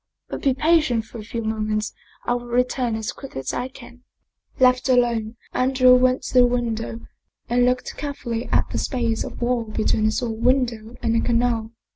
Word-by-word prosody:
But - - -5
be 270 -2 +2
patient 300 -7 +2
for 225 - -10
a - - -7
few 230 +2 -5
moments,, 215 -1 -2 0.3
I 240 - +1
will 245 0 -4
return 245 -1 0
as 220 +1 -3
quickly 270 - -8
as 130 - -4
I 250 - -2
can." 245 -1 -14 0.6
Left 255 +1 +4
alone, 235 -3 +2 0.2
Andrea 255 0 +4
went 255 +1 +3
to - - -6
the 250 -1 +7
window 230 -2 -2 0.5
and 245 +1 +3
looked 250 0 -1
care 285 -1 -4
fully 235 -2 -4
at - - +1
the - - -2
space 235 -4 -1
of - - -6
wall 240 -1 0
between 215 0 0
his 220 +4 +1
own 225 -1 -3
window 240 -3 +1
and 230 -1 +1
the 230 - +2
canal. 230 -2 0
240 Hz, 190 wpm, -23 LUFS, 225-255 Hz, 0.6 s, the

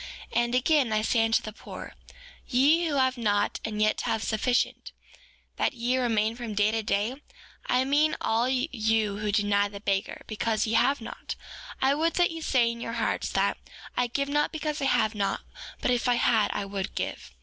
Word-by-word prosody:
4:24 - - 0
And 240 +1 -1
again, 260 -1 +3
I 215 0 +2
say 225 0 +2
unto 225 0 +2
the 215 - -6
poor, - - -9 0.5
ye 300 +7 +4
who 295 - -1
have 260 -2 +2
not 205 -3 +1
and 215 -1 -4
yet 215 0 +2
have 220 - -1
sufficient, 240 +3 0 0.7
that - - +1
ye 245 +1 0
remain 225 -2 +1
from 235 -3 -6
day 205 +1 +3
to 225 0 0
day; 220 +6 -1 0.5
I 255 +1 +2
mean 295 +3 +3
all 230 +3 +1
you 225 -6 0
who 210 -1 -1
deny 205 0 +2
the 200 0 -9
beggar, 200 -1 -2
because 220 0 -1
ye 220 - -2
have 260 +3 +3
not; 225 - -7 0.5
I 270 +1 +4
would 320 +3 0
that 350 -1 +3
ye 330 0 -6
say 245 -6 +2
in 235 0 -8
your 230 - -4
hearts 230 -1 -1
that: - - +1 0.4
I 245 - +1
give 280 +4 -1
not 295 +1 +1
because 305 -1 -3
I - - 0
have 220 -4 +2
not, 200 -2 -1 0.4
but - - +1
if 245 0 +1
I 245 - +4
had 225 -2 +3
I 205 - -3
would 195 -1 -4
give. - - -4
235 Hz, 200 wpm, -27 LUFS, 215-265 Hz, 0.7 s, ye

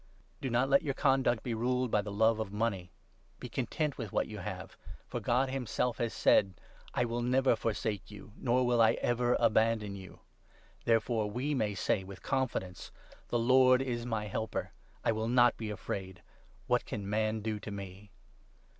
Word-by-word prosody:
Do 135 - -2
not 125 +2 +2
let 140 0 +4
your 140 -3 -2
conduct 135 -4 +2
be 120 - -2
ruled 125 +1 0
by 105 - +3
the 105 0 -6
love 110 +2 +3
5 110 -1 -2
of - - -14
money. 105 -4 -2 0.5
Be - - -6
content 145 +4 -2
with 110 -5 -5
what - - 0
you - - -7
have, - - -6 0.3
for - - -4
God 130 +3 +1
himself 125 -2 -1
has 115 -1 0
said 95 -3 +3
— - - -25
' - - -21
I - - +2
will 120 +1 -2
never 130 +1 +3
forsake 110 -3 -2
you, 105 0 -12
nor 125 0 +1
will 120 -1 +3
I 110 0 +6
ever 120 0 +1
abandon 110 -2 +2
you. 95 -2 -11 0.3
' - - -30
Therefore 115 -1 +2
we 130 +7 -2
may 105 -7 0
say 95 +1 0
with 95 0 -11
confidence 115 -9 -2 0.2
— - - -25
6 - - -22
' - - -31
The 120 - +1
Lord 130 +1 +5
is 120 -3 -2
my 110 -3 -2
helper, 110 +2 -3 0.3
I - - +4
will 110 0 -2
not 120 0 +5
be 110 -2 -5
afraid. 95 -3 -5 0.4
What - - +2
can 100 -2 -4
man 110 +1 0
do 110 0 -2
to 105 - -8
me 100 0 -8
115 Hz, 200 wpm, -32 LUFS, 105-125 Hz, 0.5 s, I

